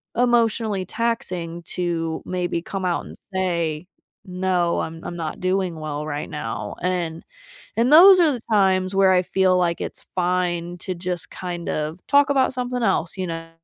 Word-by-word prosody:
emotionally 230 -4 +2
taxing 180 -7 -3
to 165 -2 -3
maybe 175 -2 -2
come 190 +1 -4
out 175 -2 -1
and - - -10 0.2
say, 170 -3 -1 0.4
“No, 180 -2 0
I'm 165 0 -6
I'm 175 - -5
not 160 -2 -4
doing 185 -1 0
well 150 -1 -4
right 150 -1 -4
now." 115 -6 -5
And, 175 -2 -2 0.5
and 235 +4 +3
those 370 +4 +10
are 330 -3 +5
the 250 -4 -4
times 190 -2 +3
where 195 -1 +5
I 180 0 +3
feel 185 0 +2
like 175 -2 0
it's - - -6
fine 175 -1 0
to 185 - -4
just 175 0 -4
kind 175 -2 -5
of 155 +3 -3
talk 285 0 +5
about 265 -2 +2
something 250 -1 -3
else, 185 -5 0
you 185 -1 -2
know. 165 0 -6
180 Hz, 165 wpm, -23 LUFS, 170-195 Hz, 0.5 s, those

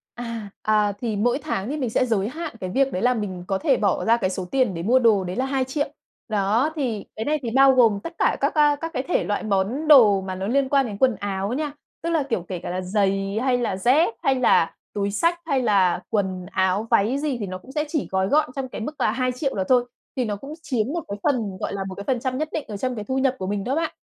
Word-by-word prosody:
À, 230 -4 -6
à, 210 -1 +2
thì 225 -4 -2
mỗi 245 +6 +1
tháng 230 -9 -3
thì 300 - -2
mình 255 -6 -2
sẽ 255 - +2
giới 215 -3 0
hạn 315 0 -6
cái 185 -1 -4
việc 270 +3 +1
đấy 185 - -2
là 250 0 +3
mình 190 -5 -4
có 195 -1 0
thể - - +2
bỏ 200 -3 0
ra 230 +1 +4
cái 190 -5 -1
số 185 -1 -3
tiền 255 -8 +1
để 165 - -4
mua 245 +7 +4
đồ, 215 -6 +3
đấy 180 +1 -4
là 260 - 0
2.000.000. 270 +2 -1 0.4
Đó, 220 +8 +1
thì 235 -8 -2
cái 220 - -3
này 305 +1 +1
thì 230 - -3
bao 270 +2 +6
gồm 225 -5 +4
tất 335 - -6
cả - - +2
các, - - +1
á, 295 -1 +4
các 330 0 -4
cái 260 - -1
thể 350 - 0
loại 205 - -1
món 215 +9 -1
đồ 215 -9 +7
mà 190 -1 -5
nó 190 +1 -4
liên 265 +3 +1
quan 275 -2 +3
đến 205 -2 -6
quần 255 -3 +3
áo 200 +1 -3
nha. 295 +1 -2 0.3
Tức 335 - -1
là 320 -3 +2
kiểu 225 -9 -2
kể 185 -2 -3
cả - - -6
là 185 +1 -2
giày, 195 +1 0
hay 255 -2 +2
là 225 -6 -1
dép, 250 - +3
hay 270 - +3
là 245 -9 +3 0.2
túi 200 -1 -1
xách, 335 +11 +1
hay 270 -4 +1
là 190 -5 +3
quần 190 -3 -1
áo, 190 +3 +1
váy 230 +4 +3
gì 285 -4 -2
thì 205 - -3
nó 185 0 -5
cũng 260 +8 -14
sẽ 300 +1 0
chỉ 305 -3 -2
gói 190 0 +1
gọn 300 -4 +2
trong 265 -1 -3
cái - - -7
mức 300 +7 -4
là - - +3
2.000.000 255 +2 -1
đó 190 -2 -1
thôi. 250 -1 +4 0.3
Thì 250 - +1
nó 205 -2 -2
cũng 275 +8 -9
chiếm 240 -8 -1
một 340 -1 -3
cái 200 - -4
phần, 225 -9 0
gọi - - -3
là, 195 -1 -3
một 185 - -6
cái 200 - -7
phần 255 -3 0
trăm 260 +1 -2
nhất 310 0 -1
định 305 - -2
ở 210 - -5
trong 255 +4 -2
cái 210 -2 -5
thu 260 0 0
nhập 265 -1 +2
của 185 - -4
mình 200 0 -2
đó 260 +3 -1
bạn. 325 +1 -1
230 Hz, 275 wpm, -23 LUFS, 200-270 Hz, 0.4 s, đồ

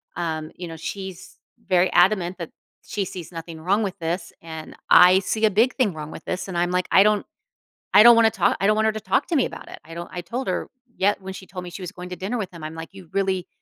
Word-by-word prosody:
um, 160 -2 -3
you 175 - -7
know, 165 -1 -8
she's 190 +2 -7 0.3
very 185 -1 +3
adamant 180 0 +3
that 170 - -5 0.3
she 200 -2 -3
sees 180 -3 -8
nothing 165 -1 -8
wrong 200 +6 +1
with 195 -3 -4
this, 170 +1 -3
and 160 -1 -9
I 180 +1 +8
see 215 +3 0
a 215 - +3
big 230 +6 +3
thing 235 -8 +1
wrong 155 -1 -7
with - - -10
this, 185 - -3
and 185 -2 -4
I'm 175 +1 +1
like, 180 0 0
I 190 - +7
don't 210 0 +2 0.7
I 205 - +10
don't 235 +1 +9
wanna 225 -1 +5
talk 195 -5 +2
I 195 - +2
don't 215 - +4
want 220 0 +2
her 220 - +3
to 215 - -5
talk 275 - +1
to 340 - +1
me 265 - +3
about - - -9
it, - - -10
I 165 +1 -10
don't 170 +1 -7
I 180 - -4
told 240 +10 -5
her - - -2 0.3
yet 200 +1 +1
when 190 0 -7
she 190 - -10
told 180 -1 -7
me 180 - -8
she 185 - -8
was 180 - -6
going 180 0 -8
to 180 - -6
dinner 195 +8 -3
with 195 -4 -4
him, 170 -3 -9
I'm 155 +1 -6
like, 165 0 -7
"You 190 -3 -13
really, 190 -2 0
185 Hz, 275 wpm, -23 LUFS, 170-205 Hz, 0.7 s, I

